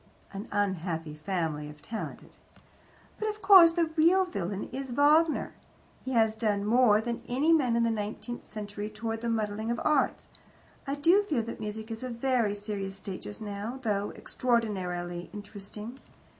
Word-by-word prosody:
An 200 +4 -6
unhappy 175 -6 -1
family, 155 -2 -2
if 150 0 -12
talented. 220 +8 -7 0.8
"But, 435 - 0
of 425 0 -6
course, 375 -4 +9
the 335 -2 +1
real 350 +4 +5
villain 200 - -4
is 265 +1 -5
Wagner. 300 +5 +3 0.5
He 260 - -3
has 220 -2 +3
done 210 -3 0
more 220 -1 +5
than 235 +1 -3
any 285 +7 +3
man 255 -7 +3
in 235 - +3
the 230 - +2
nineteenth 215 +2 -5
century 205 0 -5
towards 225 +1 -4
the 235 - -1
muddling 220 0 -1
of 235 -1 -1
arts. 300 -3 +2 0.6
I 275 - -1
do 335 +8 +5
feel 300 - -1
that 230 - -7
music 220 +1 -5
is 225 - -5
in 255 -1 -4
a - - -5
very 235 -5 +1
serious 205 -2 -4
state 195 -1 -7
just 205 - -8
now, 210 +4 -5
though 205 -2 0
extraordinarily 180 -8 -1
interesting. 210 +4 -8
220 Hz, 165 wpm, -29 LUFS, 205-255 Hz, 0.8 s, course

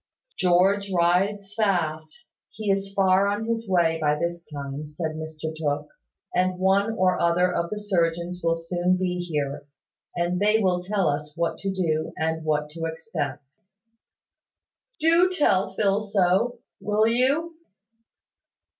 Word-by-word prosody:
"George 195 +3 +2
rides 195 +3 +1
fast; 170 -4 -1 0.3
he 215 -2 -2
is 195 0 -1
far 195 0 +3
on 205 +2 -1
his 230 -2 -2
way 165 -3 +2
by 150 -1 +2
this 170 +1 -3
time," 145 0 -6
said 155 +2 -4
Mr 155 0 -6
Tooke. 150 -1 -2 0.4
"And 185 0 +1
one 195 +4 +2
or 185 -4 +1
other 175 +1 +2
of 170 0 -1
the 210 - -4
surgeons 175 -3 -1
will 165 0 +2
soon 175 +2 0
be 180 -1 -1
here; 145 -5 -3 0.5
and 175 +1 0
they 210 +2 +4
will 185 -4 +1
tell 195 -1 0
us 150 +1 -2
what 170 0 -1
to 195 - -2
do, 160 -4 -1
and 160 0 -1
what 150 -1 -1
to 165 +1 -5
expect." 160 -4 -4 1.6
"Do 335 +3 +4
tell 205 - +2
Phil 200 -1 +2
so, 205 +4 +1 0.2
will 210 +2 +1
you?" 275 +8 +1
180 Hz, 140 wpm, -25 LUFS, 160-200 Hz, 1.6 s, they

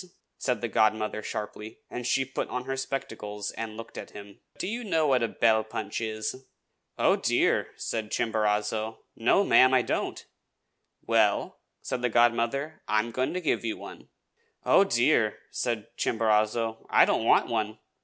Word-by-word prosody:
said 125 -4 -1
the 120 - -1
godmother 110 0 +1
sharply; 105 +1 -6
and 125 -1 -5
she 135 +1 +2
put 130 - -4
on 125 0 -3
her 135 +1 -3
spectacles 105 -6 -4
and 110 -1 -6
looked 115 0 -8
at - - -8
him. 100 -1 -12 0.2
"Do - - -3
you 230 +5 -3
know 165 -7 +1
what 130 -4 +3
a 115 - +2
bell 110 -1 +2
punch 110 0 -5
is?" 110 +4 -4 0.5
"Oh, - - +4
dear!" - - +2
said 110 -2 -4
Chimborazo. 110 0 -1
"No, 120 - +3
ma'am, 130 -8 +6
I 125 - +4
don't!" - - -3 0.8
"Well," 110 -3 +2 0.2
said 125 - -3
the 125 - +1
godmother, 120 +6 +1
"I 105 - +2
am 115 +2 0
going 130 +7 -1
to 185 - -1
give 155 - 0
you 115 -2 -2
one." - - -11 0.6
"Oh, - - +6
dear!" - - +2
said 115 -4 -2
Chimborazo, 110 0 0
"I - - +6
don't - - +1
want - - +4
one." 110 -2 -2
115 Hz, 165 wpm, -27 LUFS, 110-125 Hz, 0.8 s, ma'am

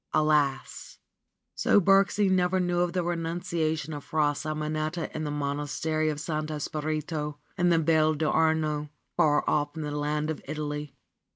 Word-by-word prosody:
Alas! 150 -3 +1 0.6
So - - +4
Birksie 195 +2 +4
never 185 0 +2
knew 175 -1 +1
of 175 -1 +1
the 180 -1 0
renunciation 165 -2 -2
of 145 -1 -6
Fra 150 -2 +1
Simonetta 155 +2 -3
in 155 0 -2
the - - -2
Monastery 150 +2 -1
of 150 -1 -3
Santo 155 0 -3
Spirito 150 0 -3 0.2
in 175 -2 +2
the 170 - +4
Val 155 -1 +3
d'Arno, 155 -1 +1 0.3
far 155 -4 +3
off 145 -1 +1
in 160 - -3
the 150 - -3
land 150 +1 -1
of 155 - -6
Italy. 150 -1 -4
155 Hz, 150 wpm, -27 LUFS, 150-165 Hz, 0.6 s, So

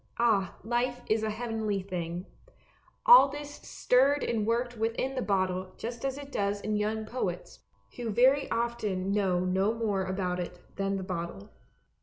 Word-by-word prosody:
Ah, 215 -6 +2
life 245 +2 -1
is 220 0 +1
a 220 - -1
heavenly 220 -2 -2
thing! 175 -1 -4 0.8
All 485 - +9
this 290 +1 -7
stirred 275 +3 +2
and 220 -2 -1
worked 240 +1 0
within 230 +4 -1
the 260 - -2
bottle 185 -3 -1
just 235 +1 -6
as 270 0 -1
it 285 -1 -9
does 200 -2 0
in 215 +1 -2
young 215 +1 -1
poets, 190 -7 -4 0.4
who 240 -2 -3
very 265 +6 +4
often 220 -5 -1
know 190 -3 +2
no 190 +4 +1
more 210 -4 0
about 185 -1 -2
it 180 0 -5 0.2
than 195 0 -1
the 190 - -4
bottle. 170 - -5
215 Hz, 160 wpm, -29 LUFS, 190-240 Hz, 0.8 s, All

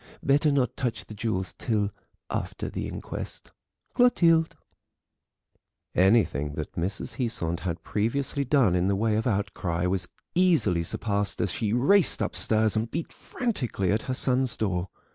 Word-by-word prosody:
Better 145 +2 +3
not 130 -3 +1
touch 120 -4 -3
the - - -10
jewels 105 -4 -2
till 105 -3 0 0.4
after - - -3
the - - -4
inquest. - - -6 0.4
"CLOTILDE." 165 -10 +4 1.4
Anything 90 - +3
that 75 - -5
Mrs. 100 +7 -4
Heasant 85 -9 -2
had 85 -1 -4
previously 135 +6 -1
done 130 -8 +3
in 90 +1 +2
the 100 - +2
way 110 +2 +1
of 110 +3 0
outcry 95 -5 -1
was 90 -1 -1 0.3
easily 165 - +3
surpassed 100 +4 -1
as 100 - 0
she 105 +2 -1
raced 145 - +3
upstairs 110 -1 +2
and 110 +1 0
beat 165 +7 -4
frantically 125 - -2
at 110 +2 +1
her 130 - 0
son's 130 -1 +2
door. 95 -3 -1
110 Hz, 145 wpm, -27 LUFS, 95-130 Hz, 1.4 s, CLOTILDE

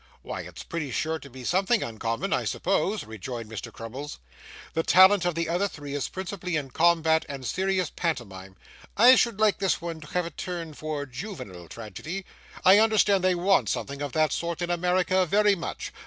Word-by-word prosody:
'Why, - - -5
it's - - -9
pretty 160 -4 -4
sure 160 +6 -1
to 140 - -12
be 130 0 -10
something 190 - +2
uncommon, 115 - -2
I - - +1
suppose,' 195 +2 0
rejoined 110 +1 -7
Mr. 110 - -6
Crummles. 130 +6 -7 0.6
'The 165 - +1
talent 190 +2 +6
of 175 -2 0
the 165 0 -1
other 175 +5 +1
three 145 -6 -8
is 145 -2 -2
principally 185 -2 -4
in 140 -4 -3
combat 160 0 +3
and 135 -2 -6
serious 190 +3 0
pantomime. 95 - -4 0.4
I 240 +5 +9
should 235 -5 +1
like 215 -2 +3
this 195 -2 +1
one 165 -2 -6
to 155 - -11
have 180 -1 +1
a 170 - -6
turn 170 -1 -5
for 150 -1 -4
juvenile 130 - -8
tragedy; 155 - -7 0.4
I 190 +3 +8
understand 210 -3 +4
they 185 -1 +3
want 175 - +2
something 140 +6 -3
of 145 -2 -3
that 155 -1 +2
sort 170 0 -3
in 175 - -1
America 180 +2 +2
very 205 +3 +4
much. 170 -4 -5
170 Hz, 185 wpm, -26 LUFS, 140-190 Hz, 0.6 s, I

